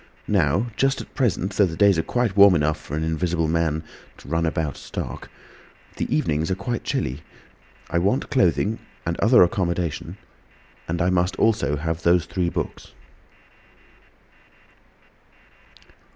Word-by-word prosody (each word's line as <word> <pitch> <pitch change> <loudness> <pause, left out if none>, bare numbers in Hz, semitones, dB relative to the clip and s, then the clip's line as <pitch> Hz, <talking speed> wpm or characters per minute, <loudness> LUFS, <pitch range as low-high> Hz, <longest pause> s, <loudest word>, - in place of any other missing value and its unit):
Now, 90 +3 +2
just 135 0 +1
at - - -10
present, 100 -6 0
though 100 - +4
the 80 - -6
days 100 -4 +4
are - - +3
quite 120 +2 -1
warm 100 -2 +7
enough 75 0 +1
for 75 - -5
an 80 - -1
invisible 80 +1 0
man 80 -1 0 0.3
to - - -15
run 80 +2 0
about 80 -2 -2
stark, - - -7 0.7
the - - -3
evenings 75 +1 0
are 95 - 0
quite 115 +5 -4
chilly. 75 - -2 0.7
I 85 +1 0
want 100 +10 0
clothing—and 95 -5 -1
other 120 -2 +6
accommodation; 85 -1 -2 0.7
and 85 +1 -1
I 90 - +2
must 90 +1 +1
also 110 -9 +1
have 80 +2 -3
those 85 +1 +3
three 90 -2 -1
books." - - -5
85 Hz, 135 wpm, -23 LUFS, 80-100 Hz, 0.7 s, warm